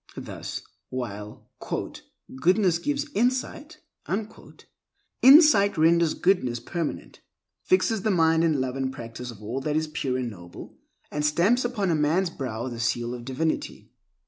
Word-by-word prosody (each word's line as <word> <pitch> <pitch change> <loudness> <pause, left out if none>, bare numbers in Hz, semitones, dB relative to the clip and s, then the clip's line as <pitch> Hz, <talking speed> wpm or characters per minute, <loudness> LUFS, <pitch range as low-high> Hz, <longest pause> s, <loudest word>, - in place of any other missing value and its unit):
Thus, - - -6 0.3
while 105 -5 -6 0.9
"Goodness 180 +2 +3
gives 290 - -2
insight," 255 - -1 1.4
insight 265 - +7
renders 165 0 +3
goodness 130 -11 +1
permanent, 165 +6 -5 0.4
fixes 225 - +1
the 215 - 0
mind 165 -3 +3
in 165 -1 +3
the 145 - -1
love 130 0 -2
and 135 -1 -2
practice 120 0 -8
of 110 -3 -10
all 120 +6 -4
that 150 +2 -2
is 160 0 +1
pure 135 -4 -2
and 125 -2 -3
noble, 85 -3 -12 0.4
and 150 - -2
stamps 180 +12 +3
upon 200 -10 0
man's 165 +4 +1
brow 125 -5 -4
the 120 -2 -6
seal 120 +1 -1
of 120 -1 -7
divinity. 135 +5 -3
155 Hz, 140 wpm, -25 LUFS, 125-195 Hz, 1.4 s, insight